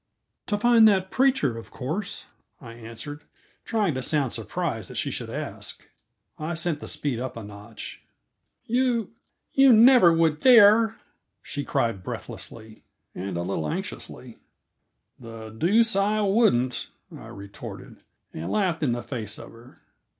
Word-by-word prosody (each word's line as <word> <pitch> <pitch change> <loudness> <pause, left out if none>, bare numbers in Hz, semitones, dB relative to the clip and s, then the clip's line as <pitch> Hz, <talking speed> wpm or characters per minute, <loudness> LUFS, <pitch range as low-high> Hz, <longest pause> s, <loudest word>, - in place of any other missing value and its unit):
"To 205 - 0
find 230 0 +6
that 190 -3 +2
preacher, 250 - +2
of 115 - -12
course," 160 +10 -5 0.3
I 115 -3 -10
answered, 115 +6 -9 0.4
trying 210 -7 0
to 130 - -3
sound 140 -1 0
surprised 115 - -3
that - - -9
she - - -1
should - - -5
ask, - - -7 0.5
I 160 +2 -3
sent 165 -2 -2
the - - -8
speed 135 -6 -3
up 130 -1 -5
a 115 - -6
notch. 105 +1 -10 0.6
"You 240 -3 0 0.4
you 270 -1 +6
never 235 -5 +7
would 165 -2 +2
dare!" 225 -2 +6 0.5
she 145 - -5
cried 115 -8 -1
breathlessly, 110 +3 -8 0.3
and 95 -1 -5
a 85 - -2
little 85 -4 -2
anxiously. - - -7 0.8
"The 115 -2 -9
deuce 215 - +3
I 205 +2 +2
wouldn't!" 195 - +2 0.3
I - - -11
retorted, 100 0 -10 0.4
and 80 +3 -5
laughed 180 -6 0
in 135 -6 +1
the 120 -1 -4
face 110 -3 -5
of - - -11
her. 120 +3 -17
150 Hz, 145 wpm, -25 LUFS, -, 0.8 s, never